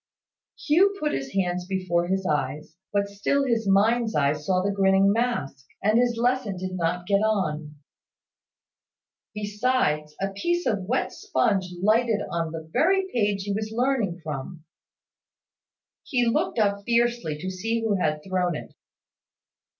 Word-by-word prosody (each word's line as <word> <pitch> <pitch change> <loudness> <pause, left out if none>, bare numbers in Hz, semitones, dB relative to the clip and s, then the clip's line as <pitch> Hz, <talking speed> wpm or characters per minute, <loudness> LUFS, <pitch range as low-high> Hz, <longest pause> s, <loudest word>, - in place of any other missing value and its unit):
Hugh 380 +7 +4
put 300 - 0
his 135 0 -4
hands 180 -2 0
before 185 -3 0
his 190 +1 -1
eyes; 150 +1 -2 0.2
but 200 -1 +1
still 205 +8 0
his 230 -4 0
mind's 220 +4 +3
eye 140 -1 +3
saw 180 +5 -1
the 200 - +1
grinning 195 0 +4
mask, 210 - -2 0.2
and 215 +3 +4
his 240 -1 +1
lesson 240 -4 0
did 185 +1 -4
not 175 0 -1
get 200 +1 +3
on. 160 -9 -1 1.6
Besides, 205 -8 0
a 195 - -1
piece 345 - -1
of 200 -4 0
wet 250 +7 0
sponge 225 - 0
lighted 215 +2 +2
on 165 -1 -2
the 160 -1 -7
very 380 +4 +3
page 205 -4 +1
he 200 0 -2
was 215 +1 -3
learning 230 -7 0
from. 155 +2 -6 1.4
He 245 -3 0
looked 300 +9 0
up 200 -2 +1
fiercely, 235 -8 +1
to 185 +5 -4
see 225 +5 -2
who 220 -2 +1
had 155 -4 -1
thrown 180 -3 0
it. - - -8
200 Hz, 145 wpm, -25 LUFS, 175-235 Hz, 1.6 s, Hugh